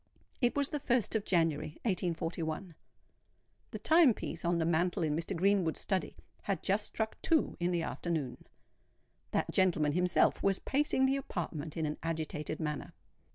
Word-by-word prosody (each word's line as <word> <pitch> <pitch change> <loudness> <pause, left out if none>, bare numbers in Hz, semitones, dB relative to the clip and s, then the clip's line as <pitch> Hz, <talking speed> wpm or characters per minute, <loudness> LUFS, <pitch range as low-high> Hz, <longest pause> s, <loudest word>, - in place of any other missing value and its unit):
It 245 -1 +2
was 285 -1 +2
the 295 - -2
1st 250 -5 +1
of 215 -2 0
January, 160 -3 +1
1841. 175 -3 -2 1.0
The - - -5
time 315 -8 +5
piece 170 - -5
on 170 0 +2
the 165 - +1
mantel 170 +2 +1
in 150 -2 +1
Mr. 170 +4 -2
Greenwood's 190 -2 +2
study 190 -5 -1 0.3
had 195 -5 -2
just 200 +2 +1
struck 220 0 -3
two 320 -2 +2
in 175 0 +1
the 175 -2 0
afternoon. 155 -10 -3 0.8
That - - -1
gentleman 165 -6 +3
himself 180 +3 +2
was 195 -1 +2
pacing 275 -1 +1
the 270 +1 +2
apartment 165 - -4
in 160 - 0
an 150 0 -3
agitated 160 -2 -3
manner. 150 -3 -3
175 Hz, 155 wpm, -32 LUFS, 160-205 Hz, 1.0 s, time